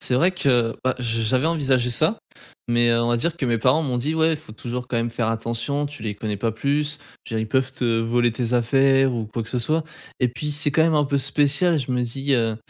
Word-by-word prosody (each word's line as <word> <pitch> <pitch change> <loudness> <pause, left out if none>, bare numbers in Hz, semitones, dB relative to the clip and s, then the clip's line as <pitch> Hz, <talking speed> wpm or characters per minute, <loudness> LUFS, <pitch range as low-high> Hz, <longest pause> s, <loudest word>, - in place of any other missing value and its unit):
C'est 125 - -1
vrai 170 +9 +4
que 125 -10 +1
bah 130 - +2
j'ai 115 -2 -1
j'avais 130 +6 +1
envisagé 135 -7 +1
ça, 120 - +1 0.5
mais 120 0 +3
heu, 115 0 +2
on 120 - 0
va 120 - +2
dire 165 +8 0
que 140 - -2
mes 115 -1 +1
parents 130 +7 +3
m'ont 130 -5 -1
dit: 145 +6 -1
«Ouais, 160 0 +3
il - - -1
faut 150 -8 -12
toujours 125 +2 -5
quand 120 - -2
même 115 0 0
faire 115 -1 -1
attention, 115 +6 -2
tu 145 -5 -9
les 105 -2 -3
connais 105 0 -4
pas 115 +3 -1
plus, 145 +5 0 0.3
je 115 - -6
veux 110 - 0
dire 110 - -2
ils - - -15
peuvent 130 +2 +1
te 130 - -4 0.2
voler 120 +1 +1
tes 120 +1 -3
affaires 135 +2 +3
ou 115 -2 -3
quoi 115 +2 -4
que 110 - -6
ce 125 - -1
soit.» 155 +7 0 0.4
et 125 - +3
puis 125 +5 -4
c'est 150 0 +2
quand 160 +3 +3
même 160 0 +3
un 150 -1 +3
peu 140 0 0
spécial, 145 +5 +2
je 130 -2 -4
me 125 0 0
dis, 135 +4 -2
heu, 115 -3 0
125 Hz, 270 wpm, -22 LUFS, 115-145 Hz, 0.5 s, vrai